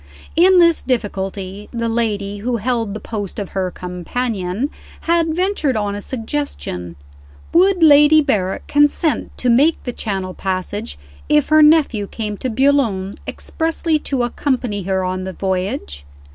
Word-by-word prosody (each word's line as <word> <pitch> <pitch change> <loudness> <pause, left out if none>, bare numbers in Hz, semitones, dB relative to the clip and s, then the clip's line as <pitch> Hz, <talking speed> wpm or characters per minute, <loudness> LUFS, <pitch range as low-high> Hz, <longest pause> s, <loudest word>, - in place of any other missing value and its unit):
In 365 +3 +6
this 335 -2 +5
difficulty, 200 -4 -3
the 230 -1 -2
lady 210 -3 -1
who 235 +3 -1
held 225 -2 -1
the - - -4
post 205 -4 -5
of 200 -3 -4
her 190 -1 -2
"companion" 185 - -3 0.3
had 330 -1 +1
ventured 355 - 0
on 205 -1 -1
a 205 - -5
suggestion. 225 - -4 0.6
Would 365 0 +4
Lady 295 0 +7
Berrick 210 -11 0
consent 290 +2 +1
to 250 - -2
make 275 +7 +3
the 245 - -4
Channel 190 -5 -3
passage 185 - -4 0.3
if 150 - +3
her 310 0 +6
nephew 300 -9 +4
came 210 -1 -4
to 255 - -3
Boulogne 230 -7 +1
expressly 325 -1 -1
to 270 -4 -1
accompany 245 -4 -1
her 190 0 -1
on 185 0 -2
the 190 0 -5
voyage? 190 - -3
230 Hz, 145 wpm, -19 LUFS, 195-290 Hz, 0.6 s, Lady